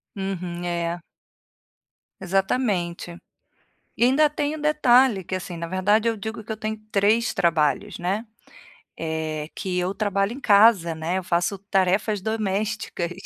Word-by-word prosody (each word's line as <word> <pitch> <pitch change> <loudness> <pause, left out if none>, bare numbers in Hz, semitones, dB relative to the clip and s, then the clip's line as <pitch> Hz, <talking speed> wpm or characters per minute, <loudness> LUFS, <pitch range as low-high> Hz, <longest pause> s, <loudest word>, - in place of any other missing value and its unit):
Uhum, 180 -3 -4
é. 170 0 -2 1.2
Exatamente, 190 -3 -1 0.8
e - - +1
ainda 290 +4 +4
tem 295 0 -2
um - - -9
detalhe, 260 - +4
que, 185 - -8
assim 185 -1 -4
na 170 0 -4
verdade, 205 +6 +2
eu 225 - -2
digo 220 +2 -6
que 220 - -7
eu 215 - -4
tenho 220 0 -3
3 210 +4 +2
trabalhos, 165 +3 +1
né, 195 +6 -2 0.7
eh, 160 -1 -4
que 180 -1 -2
eu 185 +2 -2
trabalho 200 0 0
em 260 - -7
casa, 200 -7 +5
né, 160 +4 -2
eu 190 - -3
faço 175 +3 0
tarefas 195 +1 0
domésticas. 215 -3 -2
195 Hz, 140 wpm, -24 LUFS, 175-220 Hz, 1.2 s, casa